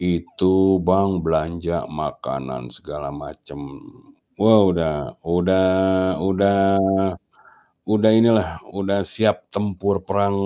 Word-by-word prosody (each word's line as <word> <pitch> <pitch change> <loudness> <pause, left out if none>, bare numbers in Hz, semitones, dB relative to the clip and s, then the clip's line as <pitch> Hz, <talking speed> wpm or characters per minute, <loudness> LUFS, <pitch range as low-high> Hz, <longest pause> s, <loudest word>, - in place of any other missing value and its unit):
Itu 95 +2 +1
Bang 95 0 +2
belanja 85 +2 -2
makanan 65 -4 -6
segala 75 -1 -7
macem. 70 0 -11 0.8
Wow 105 -3 +5
udah 80 -4 -3
udah 95 +2 +2 0.6
udah 100 +1 +2 1.3
udah 110 +1 +3
inilah, 110 -5 +4 0.2
udah 100 0 -2
siap 110 +2 +1
tempur 100 -1 -2
perang 100 0 0
95 Hz, 90 wpm, -20 LUFS, 80-100 Hz, 1.3 s, Wow